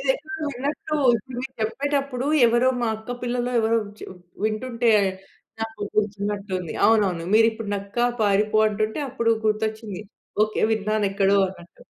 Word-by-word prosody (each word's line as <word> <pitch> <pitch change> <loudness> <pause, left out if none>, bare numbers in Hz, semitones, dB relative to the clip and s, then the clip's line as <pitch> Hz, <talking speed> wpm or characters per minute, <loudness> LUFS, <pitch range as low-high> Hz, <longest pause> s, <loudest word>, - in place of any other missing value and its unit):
ఇది 270 - -4
ఎక్కడో 315 +1 -7
విన్నట్టూ 290 +4 -3 0.2
ఇప్పుడు 250 +3 -10
మీరు 265 +1 -6
చెప్పేటప్పుడు 275 +2 -1 0.2
ఎవరో 240 +2 +3
మా 235 - +1
అక్క 220 +3 -6
పిల్లలు 245 0 -1
ఎవరో 225 +1 +2
వచ్చి 205 +1 -11 0.4
వింటుంటే 230 +2 0 0.7
నాకు 225 -1 -5 0.2
గుర్తున్నట్టుంది. 200 -3 -2
అవునవును. 195 -7 +2
మీరు 225 +1 +6
ఇప్పుడు 220 -1 -7
నక్క 200 +3 -7 0.2
పారిపో 210 +1 +3
అంటుంటే 215 +4 -2
అప్పుడు 230 -3 +1
గుర్తొచ్చింది. 215 -2 -2 0.4
ఓకే. 215 - -4
విన్నాను 215 0 0
ఎక్కడో 200 0 +3
అన్నట్టు. 175 -2 -14
220 Hz, 135 wpm, -24 LUFS, 205-245 Hz, 0.7 s, మీరు